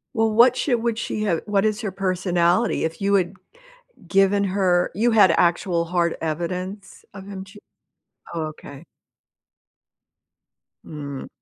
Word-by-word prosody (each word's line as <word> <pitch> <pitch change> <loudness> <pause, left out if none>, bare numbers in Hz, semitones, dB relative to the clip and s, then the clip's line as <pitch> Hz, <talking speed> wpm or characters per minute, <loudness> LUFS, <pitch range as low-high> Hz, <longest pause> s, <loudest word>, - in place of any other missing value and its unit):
Well, 225 -1 +2
what 240 +3 +5
should 245 -5 0
would 235 -2 0
she 215 -2 -3
have 170 -6 0
what 205 -1 +1
is 215 +1 0
her 210 -4 -3
personality? 185 +1 +1
If 160 +3 -4
you 200 0 +1
had 185 -1 +1 0.8
given 195 +2 +3
her 185 -2 +1
you 230 +6 +2
had 210 -5 +6
actual 170 0 +1
hard 170 0 0
evidence 180 +5 -5
of 195 -1 -10
him 195 -1 -7
ch 200 +2 -15 0.8
Oh 165 -1 -2
okay. 150 0 -11 2.0
Mm. 140 -3 -7
190 Hz, 135 wpm, -22 LUFS, 170-210 Hz, 2.0 s, had